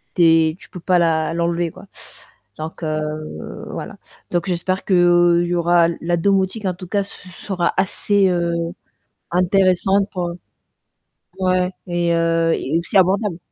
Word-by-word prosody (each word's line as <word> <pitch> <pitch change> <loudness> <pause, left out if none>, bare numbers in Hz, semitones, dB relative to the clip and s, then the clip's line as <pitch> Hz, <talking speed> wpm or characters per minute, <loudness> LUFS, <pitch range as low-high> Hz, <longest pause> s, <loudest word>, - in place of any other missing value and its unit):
tu 175 - +3
es 160 -1 +4
tu - - -15
peux 180 - -9
pas 180 -1 +2
la 160 -1 +1
l'enlever, 170 0 -1
quoi. 185 +2 -14 0.7
Donc, 160 +2 -7
heu, 155 - -5
voilà. - - -6 0.4
Donc 175 +2 -1
j'espère 185 +1 -1
qu'il 175 -2 +4
y 175 - -1
aura 170 0 +3
la 175 +1 0
domotique 195 +3 0
en 185 - 0
tout 180 0 -10
cas 200 +1 0
se 185 -2 -12
sera 180 -1 -2
assez, 195 +1 +2
heu, 170 -1 0 0.8
intéressante 190 +2 +2
pour, 175 -2 -3 1.1
ouais 185 0 +1 0.2
et 175 -1 0
heu 165 0 +2
et 160 +5 -1
aussi 175 +4 -1
abordable. 190 0 +2
175 Hz, 145 wpm, -20 LUFS, 170-185 Hz, 1.1 s, es